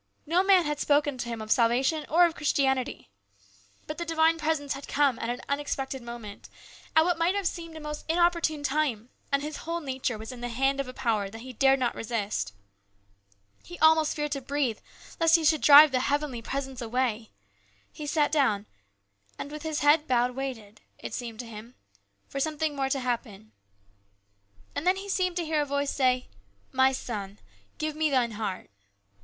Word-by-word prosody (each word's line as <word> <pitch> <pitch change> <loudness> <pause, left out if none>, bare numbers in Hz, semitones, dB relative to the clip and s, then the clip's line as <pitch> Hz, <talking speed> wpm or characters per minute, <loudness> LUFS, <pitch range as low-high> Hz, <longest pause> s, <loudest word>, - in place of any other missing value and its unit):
No 335 +4 +3
man 380 -3 +5
had 295 0 -2
spoken 290 -3 +2
to 240 - -3
him 230 -2 -4
of 215 - -7
salvation 260 +6 +2
or 350 +3 +6
of 335 - 0
Christianity. 265 - 0 0.7
But 305 +2 -6
the - - -1
divine 325 0 +2
presence 305 -3 -1
had 275 +1 -8
come 280 -4 +2
at 230 - -3
an 245 +1 -3
unexpected 275 -2 -3
moment, 235 -4 -9 0.5
at 320 0 +6
what 350 -1 0
might 345 +4 +2
have 400 -1 -1
seemed 335 -1 -4
at 315 - -8
a - - -9
most 300 0 -6
inopportune 335 -3 +2
time, 265 -5 -1 0.2
and 280 0 +1
his 300 0 -5
whole 335 +1 -4
nature 260 -6 -3
was 220 +3 -8
in 250 -1 -10
the 245 - -3
hand 270 +3 0
of 275 - -2
a - - -6
power 215 -5 0
that 225 +3 -10
he 255 +1 -9
dared 270 +3 +4
not 250 -2 0
resist. 210 - -3 1.1
He 350 - -10
almost 315 -1 +4
feared 295 -1 -2
to 275 - -2
breathe 265 -4 -1 0.4
lest 330 0 +5
he 325 -2 +2
should 310 0 +4
A - - -19
CHANGE. - - +3
99 290 +1 +12
drive 300 - -6
the 255 - +2
heavenly 285 -4 -1
presence 270 +1 -4
away. 235 -2 -1 0.6
He 300 - -7
sat 295 0 +1
down, 240 -9 +2 0.7
and 285 - -6
with 300 0 -7
his 315 -1 -3
head 295 +1 +4
bowed 245 -1 +2
waited, 245 -6 -6 0.2
it - - -8
seemed 230 -2 -5
to - - -10
him, 230 +2 -11 0.5
for 275 - -5
something 310 0 -1
more 270 -1 -1
to 270 - 0
happen. 220 -4 -4 1.2
And 325 - -3
then 370 - +5
he 390 +1 -7
seemed 365 -2 0
to 345 -2 -1
hear 310 -1 +1
a - - 0
voice 280 0 -1
say, 255 -2 +1 0.2
" 100 0 -38
My 265 0 +6
son, 205 -6 -5 0.4
give 310 -1 -3
Me 310 0 +1
thine 250 -4 +1
heart." 205 - -5
275 Hz, 200 wpm, -27 LUFS, 240-310 Hz, 1.2 s, 99